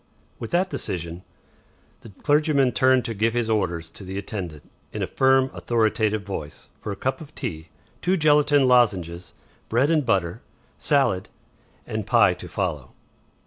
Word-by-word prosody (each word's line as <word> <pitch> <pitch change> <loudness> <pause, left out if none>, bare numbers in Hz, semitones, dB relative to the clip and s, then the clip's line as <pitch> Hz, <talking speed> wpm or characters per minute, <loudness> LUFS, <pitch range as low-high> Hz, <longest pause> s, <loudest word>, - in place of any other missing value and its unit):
With 115 - -6
that 185 +2 +1
decision, 85 0 -4 0.8
the 115 - -12
clergyman 145 -3 +3
turned 130 -1 +3
to 115 - -2
give 110 +2 0
his 115 -2 0
orders 85 -6 -1
to - - -12
the 95 +1 -6
attendant, 95 -7 -6 0.2
in - - -3
a - - +1
firm, 130 0 +3
authoritative 110 -2 0
voice, 80 -7 -7
for 105 - -4
a - - -4
cup 130 - -2
of 155 -1 -12
tea, 80 0 -5 0.3
two 185 +2 +2
gelatine 145 -3 +4
lozenges, 90 -9 +2 0.3
bread 130 +7 +2
and 155 -2 +3
butter, 95 -8 0 0.4
salad, 135 -11 +1 0.6
and 110 -1 -4
pie 105 -6 +5
to 90 - -9
follow. 80 -10 -3
110 Hz, 150 wpm, -24 LUFS, 90-135 Hz, 0.8 s, pie